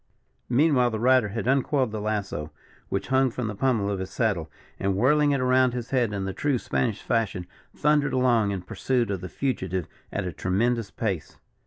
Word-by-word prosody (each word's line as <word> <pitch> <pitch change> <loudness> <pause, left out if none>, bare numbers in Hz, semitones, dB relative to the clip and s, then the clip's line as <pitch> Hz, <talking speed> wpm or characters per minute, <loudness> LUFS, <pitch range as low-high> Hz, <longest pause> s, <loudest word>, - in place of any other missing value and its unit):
Meanwhile 130 -1 +4
the 110 -2 -3
rider 125 -1 +4
had 115 +3 -4
uncoiled 135 -2 +2
the 110 -1 -4
lasso, 100 -8 -2 0.4
which 100 +2 -2
hung 130 0 +3
from 125 0 -4
the 110 - -3
pummel 115 -2 +1
of 100 - -2
his 95 0 -4
saddle, 95 -7 -1 0.3
and 100 0 0
whirling 145 +8 +3
it 140 -1 +2
around 130 -1 +3
his 120 0 -5
head 125 -5 +2
in 100 -2 -3
the 95 - -3
true 145 +3 0
Spanish 115 -2 -1
fashion, 110 -6 -1 0.3
thundered 150 -1 +2
along 120 -5 +3
in 95 -3 -3
pursuit 120 +4 -1
of 95 -3 -3
the 90 - -6
fugitive 95 - -2 0.3
at - - -2
a 90 - -3
tremendous 105 +7 0
pace. 100 -8 -3
115 Hz, 190 wpm, -26 LUFS, 100-130 Hz, 0.4 s, Meanwhile